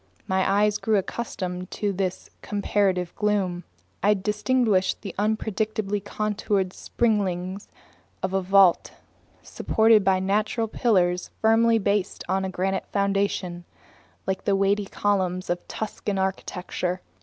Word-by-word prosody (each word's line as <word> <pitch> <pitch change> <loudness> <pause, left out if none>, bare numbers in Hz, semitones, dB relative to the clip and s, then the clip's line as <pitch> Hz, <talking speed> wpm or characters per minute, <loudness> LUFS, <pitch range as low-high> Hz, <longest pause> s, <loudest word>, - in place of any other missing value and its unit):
My 190 +2 +2
eyes 210 0 +2
soon - - -27
grew 220 -1 +2
accustomed 185 -3 -4
to 205 -2 -2
this 185 -1 -3
comparative 195 -3 0
gloom. 195 -4 0 0.4
I 205 +2 +4
distinguished 210 0 +1
the 195 - -6
unpredictably 215 -1 -1
contoured 205 -2 -1
springings 195 -4 -1 0.6
of 190 - -1
a 195 - +2
vault, 190 -1 +4 0.5
supported 220 -1 +3
by 190 0 +3
natural 210 +4 0
pillars 180 -6 +1
firmly 225 +1 +4
based 200 -2 -1
on 190 +1 0
a 190 - -2
granite 190 +1 -2
foundation, 200 -3 -1 0.6
like 190 0 -2
the 200 - +3
weighty 200 +1 +2
columns 185 -4 0
of 175 - -3
Tuscan 210 -2 -4
architecture. 185 -1 -2
195 Hz, 120 wpm, -25 LUFS, 185-210 Hz, 0.6 s, I